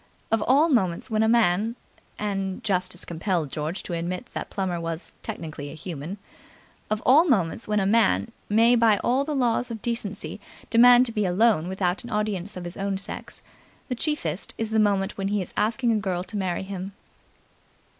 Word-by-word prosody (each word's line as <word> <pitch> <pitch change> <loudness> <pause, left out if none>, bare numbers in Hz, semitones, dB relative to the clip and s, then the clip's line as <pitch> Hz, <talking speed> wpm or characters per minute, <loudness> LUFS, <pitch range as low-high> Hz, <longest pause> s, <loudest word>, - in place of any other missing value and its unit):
Of 225 -1 +2
all 285 +6 +5
moments 225 - +1
when 215 0 +2
a 220 - +3
man 225 -1 +3 0.4
and 195 -2 -3
justice 185 -2 -1
compelled 170 -3 -2
George 155 +5 -3
to 175 - -5
admit 175 +7 -3
that - - -5
Plummer 185 -3 -2
was 165 +1 -5
technically 145 -3 -6
human 165 +2 -6 0.7
of 215 0 -1
all 285 +6 +7
moments 220 - +1
when 210 0 +1
a 195 - +1
man 225 +2 +3 0.2
may 230 +3 +5
by 225 -3 +4
all 255 +3 +2
the 300 +1 -3
laws 245 -1 +1
of 225 -2 -7
decency 230 -4 -3 0.3
demand 245 +2 +7
to 235 - -1
be 210 -3 0
alone 185 -2 +3
without 185 +1 -1
an 240 - -8
audience 210 -2 -2
of 180 - -6
his 175 +1 -6
own 195 0 -1
sex, 195 - -6 0.5
the - - 0
chiefest 235 - -2
is 225 -1 -2
the 220 - +2
moment 200 -1 +1
when 195 - -1
he 205 +1 0
is 185 - -5
asking 235 +3 +1
a 220 - +2
girl 185 -3 -2
to 210 - -8
marry 190 -3 -1
him. 190 0 -6
200 Hz, 185 wpm, -25 LUFS, 180-230 Hz, 0.7 s, all